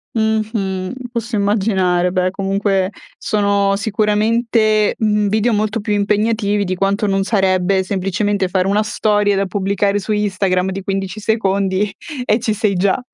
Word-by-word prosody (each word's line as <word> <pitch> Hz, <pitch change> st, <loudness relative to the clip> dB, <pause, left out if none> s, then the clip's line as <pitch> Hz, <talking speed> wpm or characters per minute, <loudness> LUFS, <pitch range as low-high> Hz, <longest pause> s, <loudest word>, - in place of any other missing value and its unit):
Mh-mh. 215 Hz, -4 st, -1 dB, 0.2 s
Posso 235 Hz, -1 st, -3 dB
immaginare. 190 Hz, -4 st, +1 dB
Beh, 185 Hz, 0 st, +1 dB
comunque, 195 Hz, 0 st, 0 dB, 0.3 s
sono 200 Hz, -1 st, +1 dB
sicuramente, 215 Hz, +1 st, +1 dB
mhmm, 210 Hz, -1 st, +1 dB
video 220 Hz, +3 st, +1 dB
molto 215 Hz, +2 st, 0 dB
più 210 Hz, 0 st, -2 dB
impegnativi 205 Hz, 0 st, +1 dB
di 185 Hz, 0 st, -2 dB
quanto 195 Hz, +3 st, 0 dB
non 195 Hz, 0 st, +1 dB
sarebbe, 190 Hz, -2 st, +1 dB
semplicemente, 195 Hz, +1 st, -1 dB
fare 185 Hz, 0 st, 0 dB
una 205 Hz, +2 st, +2 dB
storia 210 Hz, -1 st, +1 dB
da 195 Hz, 0 st, 0 dB
pubblicare 200 Hz, +1 st, 0 dB
su 205 Hz, -, -5 dB
Instagram 190 Hz, -3 st, 0 dB
di 195 Hz, 0 st, -5 dB
15 195 Hz, +1 st, -3 dB
secondi 200 Hz, -2 st, 0 dB, 0.3 s
e 215 Hz, 0 st, +2 dB
ci 220 Hz, -1 st, -1 dB
sei 210 Hz, -2 st, 0 dB
già. 195 Hz, +6 st, +1 dB
200 Hz, 140 wpm, -18 LUFS, 195-215 Hz, 0.3 s, una